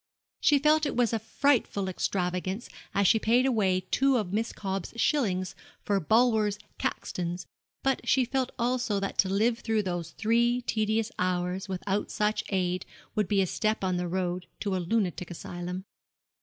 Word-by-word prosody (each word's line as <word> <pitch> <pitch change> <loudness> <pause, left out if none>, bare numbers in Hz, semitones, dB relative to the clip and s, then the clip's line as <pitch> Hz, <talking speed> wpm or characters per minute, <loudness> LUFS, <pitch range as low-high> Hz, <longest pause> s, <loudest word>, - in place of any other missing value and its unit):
She 295 - +5
felt 300 +2 +3
it - - -3
was 240 -2 +2
a 225 - +1
frightful 225 -3 +1
extravagance 185 +2 -2 0.2
as 200 -1 +3
she 220 - +5
paid 240 +4 +3
away 200 -8 +2
two 270 -1 +4
of 200 -5 -2
Miss 225 +2 0
Cobb's 195 -2 -4
shillings 200 - +1 0.3
for 200 -1 +2
Bulwer's 215 +2 +3 0.2
'Caxtons;' 175 0 -3 0.4
but 270 0 +1
she 260 -2 +4
felt 260 +1 -1
also 240 -3 0
that 195 0 -4
to 190 - +4
live 225 +4 +2
through 220 -2 0
those 175 -3 -3
three 235 +7 +1
tedious 220 0 0
hours 180 +1 -1
without 195 +2 -2
such 210 0 0
aid 180 -2 0 0.3
would 210 -3 +1
be 195 0 +3
a - - +1
step 215 +3 -1
on 185 -1 +1
the 180 0 -1
road 180 0 -2
to 200 -3 0
a - - 0
lunatic 180 -2 -1
asylum. 175 +2 -6
205 Hz, 165 wpm, -28 LUFS, 185-235 Hz, 0.4 s, She